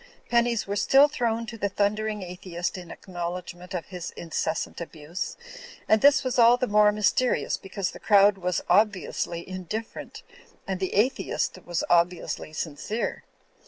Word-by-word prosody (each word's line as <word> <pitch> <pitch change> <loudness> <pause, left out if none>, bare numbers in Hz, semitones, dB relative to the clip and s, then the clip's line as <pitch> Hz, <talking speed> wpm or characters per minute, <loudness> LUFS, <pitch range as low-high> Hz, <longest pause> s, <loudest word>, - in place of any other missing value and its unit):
Pennies 235 -1 +2
were 200 - -3
still 270 +8 +6
thrown 230 -5 -1
to 230 -1 -8
the 200 - 0
thundering 210 +1 -1
atheist 175 -1 -4
in 180 -2 -8
acknowledgment 180 0 -6
of 170 - -3
his 180 -3 -6
incessant 165 0 -3
abuse; 170 +1 -6 0.5
and 215 -1 +4
this 280 0 +6
was 255 -1 -1
all 235 +1 +7
the 255 - 0
more 210 -1 +5
mys 210 0 +2
terious 255 -1 0
because 195 -1 -3
the - - -11
crowd 200 -1 +5
was 180 -1 -1
obviously 185 -3 +1
indifferent, 185 +4 -6 0.4
and 190 -1 -3
the 190 - -2
atheist 235 +7 0
was 175 -1 -1
obviously 175 -2 +1
sincere. 160 +9 -3
195 Hz, 150 wpm, -26 LUFS, 175-220 Hz, 0.5 s, all